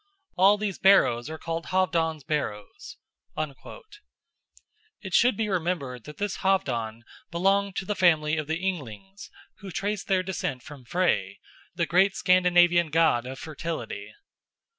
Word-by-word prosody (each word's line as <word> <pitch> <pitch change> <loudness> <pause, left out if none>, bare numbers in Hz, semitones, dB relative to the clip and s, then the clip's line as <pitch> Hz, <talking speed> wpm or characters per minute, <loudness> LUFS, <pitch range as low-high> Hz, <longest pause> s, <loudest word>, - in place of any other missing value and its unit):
All 195 +3 +5
these 205 -3 -3
barrows 150 -10 +4
are 160 - -6
called 165 +1 -5
Halfdan's 165 -5 0
barrows." 105 -10 -5 2.0
It 190 -4 -9
should 240 0 +4
be 220 - -1
remembered 165 - -2
that 150 - -10
this 205 -1 -3
Halfdan 120 - -1 0.3
belonged 195 +3 +1
to 190 - -3
the 210 - -1
family 160 -5 +3
of 155 -2 -3
the 160 +1 -1
Ynglings, 190 - -6 0.3
who 200 - -9
traced 205 +2 -3
their 190 -2 +2
descent 170 -9 -4
from 145 -4 -12
Frey, 115 - 0 0.4
the - - 0
great 190 +3 +3
Scandinavian 175 -2 +4
god 150 -6 +2
of 130 +1 -7
fertility. 165 - -6
175 Hz, 135 wpm, -26 LUFS, 150-190 Hz, 2.0 s, All